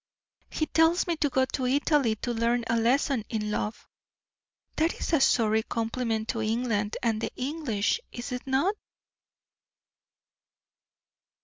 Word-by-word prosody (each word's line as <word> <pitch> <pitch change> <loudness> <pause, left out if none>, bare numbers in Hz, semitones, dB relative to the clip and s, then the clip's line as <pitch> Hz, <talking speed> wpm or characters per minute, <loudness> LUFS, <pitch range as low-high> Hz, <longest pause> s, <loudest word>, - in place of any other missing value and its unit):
"He 310 - -1
tells 325 +3 +3
me 345 - 0
to 290 - +1
go 260 0 +2
to 260 -1 -2
Italy 275 -3 +2
to 245 - -1
learn 235 +1 +1
a 230 - 0
lesson 245 +1 +2
in 210 -2 -2
love. 210 +1 -3 0.9
That 320 +2 +2
is - - -3
a 310 - +4
sorry 220 -4 +3
compliment 225 0 -2
to 225 - -1
England 220 -2 -1
and 225 -2 +1
the - - -2
English, 260 - -1
is 240 +2 -6
it 250 +1 -5
not?" 275 +10 +2
245 Hz, 135 wpm, -27 LUFS, 225-280 Hz, 0.9 s, a